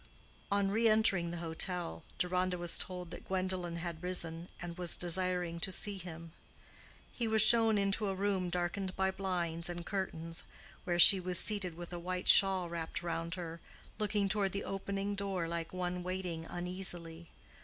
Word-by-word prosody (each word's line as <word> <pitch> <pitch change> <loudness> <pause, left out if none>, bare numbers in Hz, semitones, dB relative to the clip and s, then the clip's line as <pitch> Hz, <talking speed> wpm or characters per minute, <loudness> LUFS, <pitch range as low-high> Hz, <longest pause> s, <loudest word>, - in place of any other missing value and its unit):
On 200 -1 +2
re 225 +2 +3
entering 210 -6 +3
the 175 - -5
hotel, 160 - 0 0.2
Deronda 180 0 0
was 175 -1 0
told 180 -2 -5
that - - -9
Gwendolen 185 -2 -1
had 170 -1 -5
risen, 170 -2 -3
and 175 -1 -6
was 175 -2 +1
desiring 180 -1 0
to 190 - -1
see 200 +1 +1
him. 165 -2 -9 0.8
He 235 - -2
was 220 -1 +4
shown 225 -1 +5
into 200 +1 +1
a 195 - -1
room 190 -2 0
darkened 180 +2 -2
by 190 0 +1
blinds 175 -3 -2
and 175 -1 -5
curtains, 165 -4 -3 0.4
where 175 -1 0
she 190 +2 +10
was 180 -1 0
seated 200 -5 +2
with 175 0 -8
a 175 - -4
white 180 +1 -4
shawl 190 -2 +5
wrapped 170 0 -4
round 170 0 -3
her, 170 -2 -6 0.4
looking 205 -1 +1
toward 195 -1 0
the 200 - -2
opening 195 +1 -3
door 195 -4 -2
like 170 -1 -4
one 180 -1 -3
waiting 180 -3 -4
uneasily. 175 -2 -4
180 Hz, 165 wpm, -34 LUFS, 170-195 Hz, 0.8 s, she